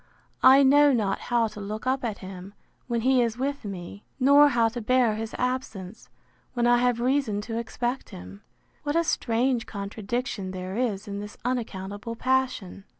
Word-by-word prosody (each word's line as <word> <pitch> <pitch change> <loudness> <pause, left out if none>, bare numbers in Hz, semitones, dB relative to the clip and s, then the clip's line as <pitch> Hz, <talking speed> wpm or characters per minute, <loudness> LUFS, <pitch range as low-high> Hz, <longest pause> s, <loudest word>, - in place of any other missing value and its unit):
I 265 +2 +8
know 290 +2 +6
not 210 -6 0
how 240 -1 +1
to 210 - -9
look 215 +3 -5
up 260 +1 0
at 220 -4 -2
him, 190 +1 -10 0.3
when 235 -2 -1
he 260 +1 +3
is 230 -1 -1
with 280 +2 -2
me; 195 0 -7 0.2
nor 285 +2 +6
how 235 -4 +3
to 240 +1 -6
bear 245 0 +3
his 220 +1 -5
absence, 235 -5 -4 0.5
when 240 -1 +1
I 240 0 +5
have 245 -1 +1
reason 250 -4 +1
to 225 +2 -4
expect 240 +2 -3
him: 90 +3 -11 0.4
What 290 0 -2
a 335 - +3
strange 240 -4 0
contradiction 205 +1 -4
there 185 0 -5
is 215 -5 -2
in 200 0 -5
this 210 0 -8
unaccountable 220 -3 -4
passion. 250 -7 -1
235 Hz, 170 wpm, -26 LUFS, 205-255 Hz, 0.5 s, I